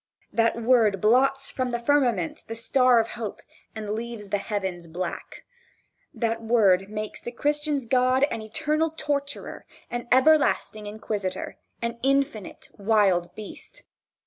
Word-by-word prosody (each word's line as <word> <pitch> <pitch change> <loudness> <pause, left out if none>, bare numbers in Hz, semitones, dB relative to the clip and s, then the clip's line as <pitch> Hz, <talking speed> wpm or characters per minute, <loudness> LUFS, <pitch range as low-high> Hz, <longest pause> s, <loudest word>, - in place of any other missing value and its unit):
That 230 0 +2
word 225 -4 +3
blots 270 +6 +3
from 255 -1 -2
the 240 - -1
firmament 240 - +1
the 225 - -5
star 250 +2 +3
of 225 0 0
hope 220 -4 -6 0.3
and 215 -1 -5
leaves 225 -2 -5
the 205 - 0
heavens 190 -5 -4
black. 175 +2 -6 0.7
That 230 -1 -2
word 200 -5 +3
makes 215 0 -5
the 240 - -6
Christian's 295 0 -1
God 255 +2 +3
an 225 - -3
eternal 310 +7 -1
torturer, 285 -2 -3 0.2
an 240 0 -4
everlasting 260 -6 +3
inquisitor 205 -2 -4 0.2
an 235 0 -3
infinite 270 -6 -1
wild 195 -4 +2
beast. 215 -1 -10
230 Hz, 130 wpm, -25 LUFS, 210-260 Hz, 0.7 s, word